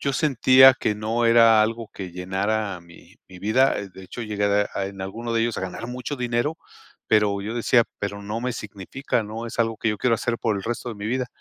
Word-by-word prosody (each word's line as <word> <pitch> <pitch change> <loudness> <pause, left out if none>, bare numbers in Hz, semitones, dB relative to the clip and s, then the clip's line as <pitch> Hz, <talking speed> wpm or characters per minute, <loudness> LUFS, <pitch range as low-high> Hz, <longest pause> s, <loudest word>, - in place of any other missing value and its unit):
yo 140 - -1
sentía 130 -2 +6
que 105 - 0
no 110 +3 -1
era 115 -1 +6
algo 115 0 -2
que 95 -2 -7
llenara 95 +2 -2
mi 85 0 -18
mi 95 - -12
vida, 110 +8 +3
de 95 0 -13
hecho 105 +6 -8
llegué 105 -2 -1
de, 100 0 +2
ah, 95 - -2
en 100 0 -9
alguno 115 +5 -5
de 115 - +1
ellos 115 -1 -1
a - - -3
ganar 95 +4 -5
mucho 125 +4 -5
dinero, 125 +5 -1 0.5
pero 105 -2 +2
yo 110 +3 -4
decía: 120 0 +3
"Pero 100 0 -4
no 105 +3 -4
me 125 0 -2
significa, 105 +5 -4
no 110 +2 -6
es 115 - -8
algo 115 -1 +1
que 115 - 0
yo 105 - -2
quiero 120 -2 +2
hacer 115 +1 -2
por 110 -3 0
el 100 - -5
resto 120 +3 -4
de - - -6
mi 100 - -5
vida", 125 +2 -1
110 Hz, 230 wpm, -23 LUFS, 100-120 Hz, 0.5 s, sentía